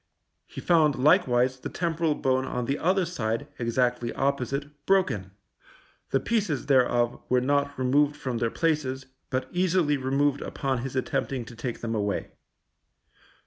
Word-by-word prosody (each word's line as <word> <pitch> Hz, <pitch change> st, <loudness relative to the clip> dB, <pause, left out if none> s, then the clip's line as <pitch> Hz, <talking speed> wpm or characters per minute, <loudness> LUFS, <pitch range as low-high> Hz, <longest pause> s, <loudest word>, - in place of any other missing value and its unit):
He -, -, -8 dB
found, 155 Hz, -5 st, +4 dB
likewise, 130 Hz, -4 st, +3 dB
the -, -, -5 dB
temporal 165 Hz, -2 st, 0 dB
bone 130 Hz, -1 st, +1 dB
on 125 Hz, -2 st, -3 dB
the 140 Hz, +4 st, -1 dB
other 185 Hz, +2 st, +2 dB
side, 115 Hz, -10 st, -2 dB
exactly 120 Hz, 0 st, 0 dB
opposite, 140 Hz, +1 st, -1 dB, 0.2 s
broken; 185 Hz, -, +2 dB, 0.8 s
the 135 Hz, -, +2 dB
pieces 195 Hz, -, -1 dB
thereof 120 Hz, -3 st, +2 dB
were 125 Hz, -, +4 dB
not 140 Hz, +2 st, 0 dB
removed 140 Hz, +3 st, +2 dB
from 130 Hz, -5 st, -3 dB
their 115 Hz, -1 st, +1 dB
places, 140 Hz, -3 st, -1 dB, 0.2 s
but 130 Hz, 0 st, -2 dB
easily 175 Hz, -4 st, +2 dB
removed 140 Hz, +2 st, +1 dB
upon 135 Hz, -2 st, -2 dB
his 130 Hz, +2 st, -5 dB
attempting 130 Hz, -1 st, -2 dB
to 120 Hz, -, -11 dB
take 120 Hz, +1 st, -5 dB
them 115 Hz, -1 st, -3 dB
away. 105 Hz, -2 st, -2 dB
135 Hz, 145 wpm, -27 LUFS, 125-150 Hz, 0.8 s, found